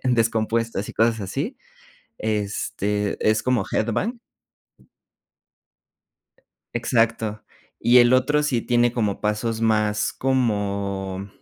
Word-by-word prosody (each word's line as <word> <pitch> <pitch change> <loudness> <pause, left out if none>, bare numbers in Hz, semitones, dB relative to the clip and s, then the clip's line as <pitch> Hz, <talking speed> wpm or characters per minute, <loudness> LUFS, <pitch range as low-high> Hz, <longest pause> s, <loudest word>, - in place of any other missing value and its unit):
descompuestas 115 -3 0
y - - -6
cosas 115 0 +2
así. 140 - -4 0.6
Este, 105 -1 -2
es 110 0 +3
como 125 -5 +1
headbang. 185 - -1 2.5
Exacto. 115 -2 0 0.4
Y 125 +1 +5
el 120 0 +6
otro 145 +4 +2
sí 125 -6 0
tiene 120 0 +2
como 105 -5 -1
pasos 110 +2 -1
más 105 -2 +1
como 100 -6 -1
110 Hz, 95 wpm, -23 LUFS, 105-120 Hz, 2.5 s, el